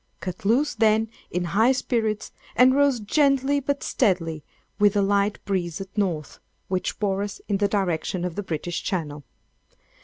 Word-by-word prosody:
Cut 185 +4 -6
loose, 260 +8 +2
then, 220 0 +2 0.2
in 180 +1 -2
high 220 +9 +3
spirits, 225 -4 -1 0.2
and 255 +1 +6
rose 280 -3 +3
gently 275 +4 +2
but 280 +1 -2
steadily, 165 - 0 0.4
with 205 0 +4
a 205 - +3
light 200 +1 +1
breeze 180 -4 -2
at 195 0 -9
North, 175 -8 -2 0.3
which 185 -1 -2
bore 200 -2 0
us 205 -1 -5
in 200 - +1
the 205 0 +2
direction 185 -2 -1
of 180 - -3
the 205 - -3
British 175 -2 -3
Channel. 150 -7 -3
205 Hz, 160 wpm, -24 LUFS, 180-230 Hz, 0.4 s, and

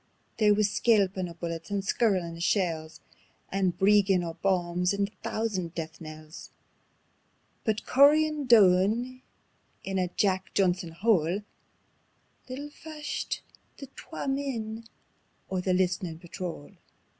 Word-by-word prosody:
There 210 -1 +5
wis 210 -1 +2
skelpin' 195 -5 +2
o' 170 - -10
bullets 165 0 -5
and 200 -1 -2
skirlin' 185 -6 +1
o' - - -10
shells, 170 -4 -1 0.5
And 190 -2 0
breengin' 195 -2 +4
o' 165 -1 -4
bombs 180 0 0
and 200 0 0
a - - -29
thoosand 190 -7 -2
death 160 0 -6
knells; 155 0 -10 1.2
But 220 -2 0
cooryin' 295 +1 +4
doon 225 +4 +4 0.6
in 195 -1 -2
a 180 - +1
Jack 190 +1 -1
Johnson 180 -3 +1
hole 190 -1 +2 1.1
Little 285 +3 -6
fashed 300 -1 -5 0.3
the 275 - -8
twa 320 - -7
men 230 -5 -3 0.7
o' 190 - 0
the 185 - 0
List'nin' 180 -2 0
Patrol. 170 -3 -7
190 Hz, 120 wpm, -28 LUFS, 175-220 Hz, 1.2 s, There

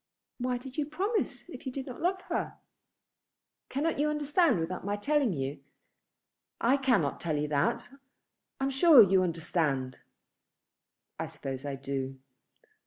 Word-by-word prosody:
"Why 250 0 0
did 260 +3 -7
you 290 - 0
promise 390 +9 -2
if 260 -3 -9
you - - -2
do 270 +1 -4
not 255 -2 -9
love 370 +2 0
her?" - - -3 1.1
"Cannot 295 +3 -1
you 300 +1 +2
understand 300 - +2
without 170 +3 -3
my 200 +1 -1
telling 280 +3 +1
you? 135 -3 -3 1.0
I 245 +4 +4
cannot 240 - +1
tell 160 -3 -1
you 150 +1 -1
that. 225 +12 0 0.7
I - - -2
am 270 - +1
sure 270 -2 +8
you 190 -1 +4
understand." 160 -6 -1 1.2
"I - - -2
suppose 135 0 -6
I 140 -1 -3
do. 135 -1 -4
235 Hz, 145 wpm, -30 LUFS, -, 1.2 s, sure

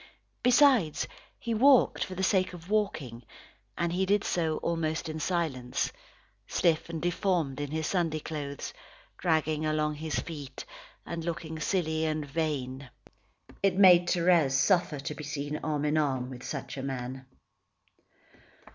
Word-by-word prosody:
Besides, 250 - +4 0.3
he 235 - -3
walked 260 +3 +5
for 185 - -6
the 190 - -2
sake 185 -1 +2
of 175 +2 -10
walking, 160 - -1 0.6
and 170 0 0
he 190 +1 0
did 205 +1 +3
so 160 -3 0
almost 160 -2 -1
in 160 0 -4
silence, 150 -8 -1 0.5
stiff 165 -1 +1
and 165 -1 -4
deformed 175 -5 0
in 145 - -3
his 155 +1 -2
Sunday 165 -4 0
clothes, 145 -2 -5 0.5
dragging 155 -2 +1
along 155 0 +1
his 155 +1 -3
feet, 145 -5 -6 0.4
and 170 -1 -4
looking 160 -1 -4
silly 160 -3 0
and 155 -1 -1
vain. 140 -3 -3 0.7
It 195 -2 +3
made 180 -3 +7
Thérèse 170 -6 +3
suffer 170 +2 +3
to 140 - -4
be 150 - -8
seen 145 0 -3
arm 150 -1 -1
in 150 +1 +2
arm 130 -4 -1
with 125 -1 -8
such - - -5
a - - -3
man. 130 -1 -5
160 Hz, 145 wpm, -29 LUFS, 145-175 Hz, 0.7 s, made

